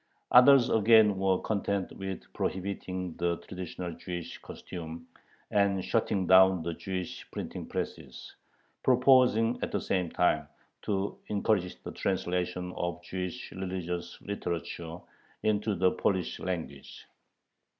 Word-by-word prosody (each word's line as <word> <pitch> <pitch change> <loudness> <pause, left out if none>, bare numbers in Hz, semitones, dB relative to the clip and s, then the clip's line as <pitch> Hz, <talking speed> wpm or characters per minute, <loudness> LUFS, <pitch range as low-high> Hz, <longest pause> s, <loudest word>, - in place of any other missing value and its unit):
Others 125 0 +7
again 110 -2 +5
were 95 -1 +2
content 100 -2 -1
with 95 -1 -5
prohibiting 95 -2 -3
the 85 -1 0
traditional 90 -1 -6
Jewish 85 0 -6
costume 85 -1 -8 0.4
and 100 -2 +2
shutting 105 -4 +1
down 95 -1 +6
the 85 0 -2
Jewish 90 +1 -5
printing - - -6
presses, - - -6 0.5
proposing 125 -3 +4
at - - -2
the - - 0
same 90 -3 -1
time 90 - +1 0.4
"to 100 -1 -1
encourage 100 -3 0
the - - -6
translation 90 -1 -2
of 85 0 -3
Jewish 90 +7 -5
religious 90 -2 -4
literature 85 -4 -4 0.5
into 105 -1 +1
the 90 0 +3
Polish 95 -3 -1
language." 80 -7 -5
95 Hz, 115 wpm, -30 LUFS, 90-100 Hz, 0.5 s, Others